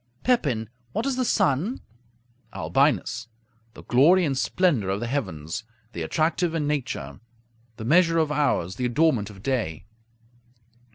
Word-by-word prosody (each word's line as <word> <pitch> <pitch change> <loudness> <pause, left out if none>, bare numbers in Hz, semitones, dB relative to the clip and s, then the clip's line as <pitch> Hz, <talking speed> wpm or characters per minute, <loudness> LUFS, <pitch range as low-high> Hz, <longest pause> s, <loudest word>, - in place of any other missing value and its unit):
Pepin 140 - +1 0.3
What 225 - -1
is 275 -2 0
the 255 - 0
sun? 185 - +1 0.8
Albinus 120 -4 +1 0.5
The - - -11
glory 165 +9 +5
and 140 -3 0
splendor 135 - +1
of 95 +1 -1
the 120 - -3
heavens; 115 - -3 0.3
the 85 - -5
attractive 160 - 0
in 155 -3 0
nature; 125 - -3 0.6
the 110 - -6
measure 165 +4 +4
of 160 -2 +2
hours; 120 - 0
the 125 - -1
adornment 125 -4 +2
of 100 -1 -13
day. 115 - -2
135 Hz, 135 wpm, -25 LUFS, 110-165 Hz, 0.8 s, glory